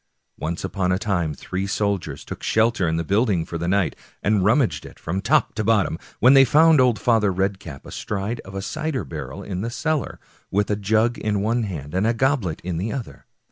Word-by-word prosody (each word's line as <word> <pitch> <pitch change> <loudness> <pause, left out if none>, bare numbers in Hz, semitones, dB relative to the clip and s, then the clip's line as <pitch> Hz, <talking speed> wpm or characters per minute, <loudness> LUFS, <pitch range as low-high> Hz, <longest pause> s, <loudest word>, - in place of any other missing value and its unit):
Once 85 +2 -3
upon 95 -1 -1
a 90 - +2
time 95 -6 -1
three 95 +7 -4
soldiers 100 -8 -2
took - - -7
shelter 110 -4 +2
in 80 0 0
the 85 - -1
building 100 -2 +1
for 85 - -5
the 85 - -2
night, 95 -1 +1 0.3
and 105 -2 +2
rummaged 115 +5 +2
it - - -12
from 90 +4 -3
top - - +2
to 110 - -2
bottom, 100 -7 +2 0.2
when 130 +2 +7
they 135 -1 +8
found 155 +2 +5
old 125 -3 +3
Father 105 -1 +2
Red 95 +1 -1
cap 75 -8 -10
astride 105 +3 -4
of 95 +1 -10
a 95 - -3
cider 150 +1 -2
barrel 65 - -7
in 95 -2 -4
the 115 - -2
cellar, 150 +1 -2 0.3
with 105 +1 0
a - - +2
jug 110 +4 +1
in 105 -2 -1
one 115 +3 +1
hand 75 -7 -6
and 95 +4 +1
a 115 - +1
goblet 120 - 0
in 90 -2 -3
the 100 +6 -2
other. 130 -6 -7
100 Hz, 215 wpm, -23 LUFS, 90-115 Hz, 0.3 s, they